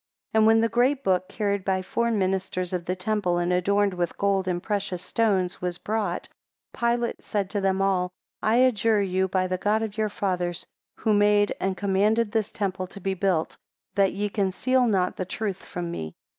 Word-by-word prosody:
3 220 - +3
And 220 - +5
when 225 0 +5
the 230 - +3
great 255 +5 +2
book, 185 -1 +1
carried 200 -3 -1
by 185 0 0
four 235 +5 0
ministers 190 -3 -1
of 175 -2 -2
the 180 - -1
temple, 185 -2 0
and 175 +1 +1
adorned 200 +2 +2
with 175 -1 -2
gold 195 -1 +1
and 175 -1 -1
precious 200 -4 -2
stones, 190 -2 0
was 180 -1 -2
brought, 210 -4 -2 0.5
Pilate 235 0 0
said 200 -2 -2
to 205 - -1
them 195 0 +1
all, 185 -2 +1 0.3
I 215 +1 +2
adjure 225 -4 +3
you 190 0 +1
by 185 0 0
the 185 0 -2
God 215 +3 +1
of 220 0 -5
your 215 -1 +1
Fathers, 180 -4 -2 0.3
who 220 - +1
made 205 0 +4
and 190 0 -1
commanded 205 +3 +2
this 220 -2 0
temple 190 -3 -2
to 200 - -10
be 195 0 -1
built, 185 -4 0 0.4
that 195 -2 +2
ye 205 +2 -1
conceal 235 +6 +1
not 185 -4 +1
the - - -1
truth 195 0 -4
from 175 -1 -5
me. 80 - -6
195 Hz, 195 wpm, -25 LUFS, 185-215 Hz, 0.5 s, And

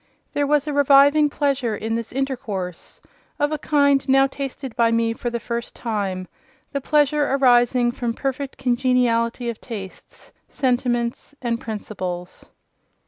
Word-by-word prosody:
There 290 0 +1
was 295 0 +2
a 300 - -3
reviving 285 +1 +5
pleasure 275 -6 0
in 225 +2 -3
this 230 -1 -3
intercourse, 230 -10 -4 0.4
of 290 +1 +1
a 305 - -2
kind 280 -2 +2
now 270 0 +6
tasted 270 -2 -6
by 235 -2 +3
me 230 0 +1
for 240 - -4
the 235 0 -3
first 235 +1 -5
time—the 225 +6 -5
pleasure 295 0 +2
arising 245 -2 +4
from 240 -1 -3
perfect 275 0 -3
congeniality 245 -2 +1
of 235 -2 -4
tastes, 200 -6 -9 0.2
sentiments, 245 0 -1
and 235 -2 -2
principles. 185 -5 -6
250 Hz, 135 wpm, -22 LUFS, 230-275 Hz, 0.4 s, now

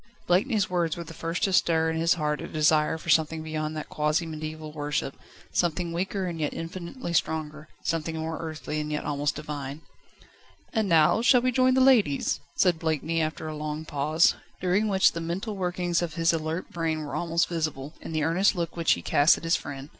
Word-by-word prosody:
Blakeney's 200 +3 +2
words 175 -3 0
were 170 - -4
the 165 - -10
first 165 +4 -3
to 195 -3 +2
stir 160 -2 +3
in - - -3
his 165 +1 +3
heart 150 -2 -1
a - - -5
desire 155 0 +2
for 165 - -9
something 160 0 +2
beyond 155 0 -3
that 155 - -5
quasi 150 +2 0
mediaeval 155 -1 -6
worship, 145 -2 -2 0.4
something 170 0 0
weaker 190 +2 -2
and 170 -2 -4
yet 150 -2 -2
infinitely 170 +4 -6
stronger, 155 -2 -1 0.2
something 165 0 -2
more 160 0 -3
earthy 155 -1 -4
and 150 0 -3
yet 150 - -2
almost 145 0 -1
divine. 145 -1 -6 0.9
"And 220 -4 +1
now, 165 +6 +5
shall 245 +1 +5
we 255 +1 +1
join 255 0 +3
the 260 - +4
ladies?" 230 - +3 0.2
said 175 -4 +3
Blakeney 160 0 0
after 155 0 -3
a 155 - -5
long 150 +1 -4
pause, 155 +2 +3 0.3
during 185 +4 +1
which 190 -2 +4
the 165 - -5
mental 190 +6 -3
workings 180 -2 -1
of 165 -2 -3
his 165 0 +2
alert 160 +2 -3
brain 160 -2 -2
were 140 - -7
almost 170 0 +1
visible, 155 -4 -3
in - - -7
the 155 -1 0
earnest 185 +6 +3
look 170 -2 -3
which 165 -2 +3
he 85 - -5
cast 145 - +4
at - - -11
his 165 +1 +2
friend. 140 0 -6
160 Hz, 200 wpm, -27 LUFS, 155-175 Hz, 0.9 s, now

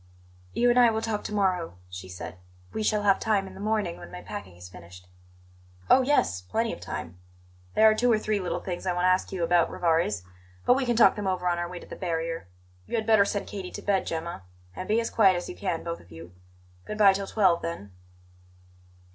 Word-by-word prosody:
"You 245 +1 +3
and 245 - +4
I 240 -1 +7
will 220 0 -2
talk 215 -2 -2
to - - -4
morrow," 185 - 0
she 90 +1 -9
said. 90 0 -8 0.3
"We - - -2
shall 210 -1 +1
have 195 -1 +4
time 210 -3 +1
in 190 - -10
the 190 - -11
morning, 210 -4 -1
when - - -11
my 180 - -8
packing 205 - -8
is 90 +1 -11
finished." 90 0 -13 0.8
"Oh, 265 - +7
yes! 250 - +1
Plenty 90 0 -1
of - - -8
time. 85 +2 -6 0.6
There 220 - +7
are 215 - +6
two 240 +3 +2
or 220 - +4
three 215 -1 -1
little 180 -3 -3
things 180 0 -5
I 180 - +2
want 175 0 -1
to 185 - +5
ask 185 0 +1
you 185 -3 -2
about, 170 0 +3
Rivarez; 160 - 0 0.4
but - - +6
we 260 0 0
can 240 - +2
talk 230 - +6
them 205 -2 -3
over 185 -1 -1
on 175 -1 +1
our 175 0 -3
way 180 - -7
to - - -10
the - - -8
barrier. 165 - -3 0.4
You - - -3
had 220 -1 -1
better 215 -2 +5
send 200 0 -2
Katie 190 -3 -6
to - - -8
bed, 200 -2 +1
Gemma; 165 - -4 0.3
and 185 - -6
be 215 +2 +2
as 230 - -2
quiet 195 -4 +5
as 175 - -4
you - - -7
can, 180 -5 -3
both 170 0 -4
of 85 - -19
you. 85 +1 -11 0.5
Good 215 - -5
bye 200 -2 +7
till 195 0 -3
twelve, 185 -6 +3
then." 160 -12 -5
185 Hz, 235 wpm, -27 LUFS, 165-215 Hz, 0.8 s, I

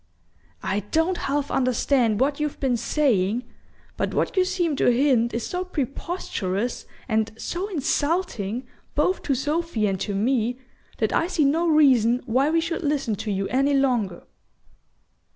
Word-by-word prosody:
"I 195 - 0
don't 320 - 0
half 285 0 -1
understand 250 -3 +2
what 280 +3 +1
you've 300 -1 -2
been 260 -3 +1
saying; 235 -3 +1 0.5
but - - -2
what - - 0
you 375 - +4
seem 355 -5 0
to - - +2
hint 240 -2 +3
is 230 - -3
so 360 0 -2
preposterous, 255 - -3 0.2
and 220 -1 0
so 355 - -3
insulting 285 - -1 0.3
both 365 +6 +1
to 275 - 0
Sophy 295 -3 -1
and 195 -2 0
to 200 0 -3
me, 240 +2 +1 0.4
that - - 0
I 330 - +2
see 325 -5 +1
no 325 +5 +2
reason 255 -6 +4
why 260 +5 +2
we 330 +1 +2
should 335 +1 -3
listen 285 -7 0
to 215 - -5
you 195 0 -1
any 275 +2 +2
longer." 240 -10 0
270 Hz, 150 wpm, -24 LUFS, 225-310 Hz, 0.5 s, you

